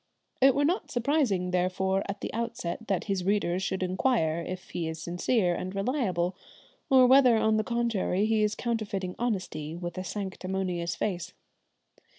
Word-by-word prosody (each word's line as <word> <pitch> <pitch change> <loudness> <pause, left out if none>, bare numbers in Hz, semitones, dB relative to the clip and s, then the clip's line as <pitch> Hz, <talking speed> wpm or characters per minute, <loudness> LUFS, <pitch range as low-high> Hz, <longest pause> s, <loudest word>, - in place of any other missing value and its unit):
It 265 0 +6
were 285 +1 +2
not 355 +7 0
surprising 240 - +1
therefore 185 +1 +1
at 200 +1 -4
the - - -4
outset 230 -3 -4
that 195 -3 0
his 195 -3 -1
readers 190 -2 +1
should 190 -1 -2
inquire 185 -3 +1
if 185 +1 -7
he 165 -2 -2
is 160 0 -5
sincere 175 +3 +1
and 185 +2 -4
reliable, 195 - 0 0.5
or 260 -2 +7
whether 255 -2 +6
on 220 0 +3
the 215 - +1
contrary 230 -5 0
he 220 0 +2
is 210 0 +1
counterfeiting 210 -6 -2
honesty 185 -9 -2
with 175 +1 -5
a - - -3
sanctimonious 185 -2 -3
face. 180 -1 -3
195 Hz, 160 wpm, -28 LUFS, 180-230 Hz, 0.5 s, or